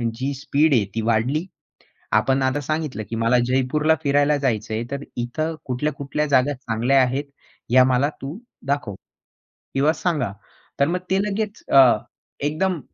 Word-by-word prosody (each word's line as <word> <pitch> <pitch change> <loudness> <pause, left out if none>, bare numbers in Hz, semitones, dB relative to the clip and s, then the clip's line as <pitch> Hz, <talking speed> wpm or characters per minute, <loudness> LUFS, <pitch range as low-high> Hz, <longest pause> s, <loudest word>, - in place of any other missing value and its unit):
जी 135 +3 -2
speed 150 +1 +2
आहे 110 -5 +3
ती 115 - 0
वाढली. 120 +9 +1 0.7
आपण 135 0 +2
आता 130 +2 0
सांगितलं, 155 -6 -3
की 115 - -3
मला 115 +2 +3
जयपूरला 140 +5 +2
फिरायला 145 +1 +3
जायचं 110 -6 -1
आहे 115 +2 -1
तर 140 0 -4
इथं 155 +7 -2
कुठल्या-कुठल्या 140 +2 -2
जागा 140 +1 +3
चांगल्या 125 +1 +1
आहेत 135 +3 -1 0.4
या 130 0 +7
मला 130 +3 +2
तू 140 +8 -6 0.3
दाखव 140 -8 -1 0.8
किंवा 145 +4 +3
सांगा. 150 - -1 0.5
तर 140 - +5
मग 180 +2 0
ते 190 - +3
लगेच 210 +1 -3
अ, 130 -5 +7 0.4
एकदम, 155 +4 0
140 Hz, 150 wpm, -22 LUFS, 125-150 Hz, 0.8 s, या